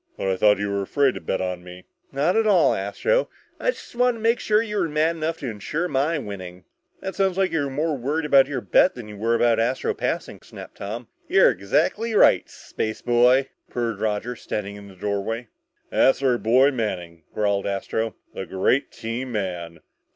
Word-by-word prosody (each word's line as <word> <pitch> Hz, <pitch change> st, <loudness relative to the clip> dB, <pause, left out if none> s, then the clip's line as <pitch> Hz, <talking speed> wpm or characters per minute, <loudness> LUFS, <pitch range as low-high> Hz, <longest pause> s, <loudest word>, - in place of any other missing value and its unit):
"But 95 Hz, -, -1 dB
I 95 Hz, -, +1 dB
thought 105 Hz, +2 st, +4 dB
you 100 Hz, 0 st, -2 dB
were 100 Hz, 0 st, -1 dB
afraid 135 Hz, +6 st, +2 dB
to -, -, -7 dB
bet 95 Hz, -, -2 dB
on 90 Hz, -1 st, -3 dB
me!" 90 Hz, 0 st, -11 dB, 0.3 s
"Not 145 Hz, +6 st, +1 dB
at 225 Hz, -1 st, +3 dB
all, 190 Hz, -5 st, +5 dB
Astro. 100 Hz, -, 0 dB, 0.3 s
I -, -, 0 dB
just -, -, -5 dB
wanted 245 Hz, 0 st, +2 dB
to 220 Hz, -, -10 dB
make 230 Hz, 0 st, +1 dB
you 210 Hz, -4 st, +2 dB
mad 155 Hz, +2 st, +1 dB
enough 160 Hz, +1 st, -2 dB
to 135 Hz, -, -4 dB
ensure 125 Hz, -, -3 dB
my 150 Hz, +2 st, 0 dB
winning." 95 Hz, -7 st, -7 dB, 0.4 s
"That 190 Hz, -, -4 dB
sounds 190 Hz, -2 st, 0 dB
like 190 Hz, -1 st, +2 dB
you 160 Hz, -3 st, 0 dB
were -, -, -3 dB
more 150 Hz, +3 st, -1 dB
worried 145 Hz, +5 st, -2 dB
about 140 Hz, -3 st, +5 dB
your 135 Hz, -3 st, -3 dB
bet 185 Hz, -, +3 dB
than 120 Hz, -3 st, -8 dB
you 105 Hz, -, -9 dB
were 115 Hz, +3 st, +1 dB
about 115 Hz, -1 st, +3 dB
Astro 125 Hz, +3 st, 0 dB
passing," -, -, -3 dB
snapped -, -, -12 dB
Tom. 110 Hz, +4 st, -6 dB, 0.2 s
"You're -, -, +5 dB
exactly 165 Hz, -, 0 dB
right, -, -, +5 dB
spaceboy," 120 Hz, +4 st, +1 dB, 0.2 s
purred 115 Hz, -4 st, -2 dB
Roger, 110 Hz, +3 st, -2 dB
standing 100 Hz, -3 st, -5 dB
in 100 Hz, 0 st, -11 dB
the 95 Hz, -, -14 dB
doorway. 105 Hz, +4 st, -3 dB, 0.4 s
"That's 135 Hz, +1 st, +3 dB
our 125 Hz, -3 st, +3 dB
boy, 125 Hz, +7 st, +4 dB
Manning," 90 Hz, -9 st, -4 dB
growled 100 Hz, -2 st, 0 dB
Astro. 105 Hz, +3 st, -2 dB, 0.2 s
"The 95 Hz, -, -6 dB
great 125 Hz, +9 st, +1 dB
team 120 Hz, +3 st, -5 dB
man!" 90 Hz, -5 st, -4 dB
120 Hz, 190 wpm, -23 LUFS, 100-150 Hz, 0.4 s, all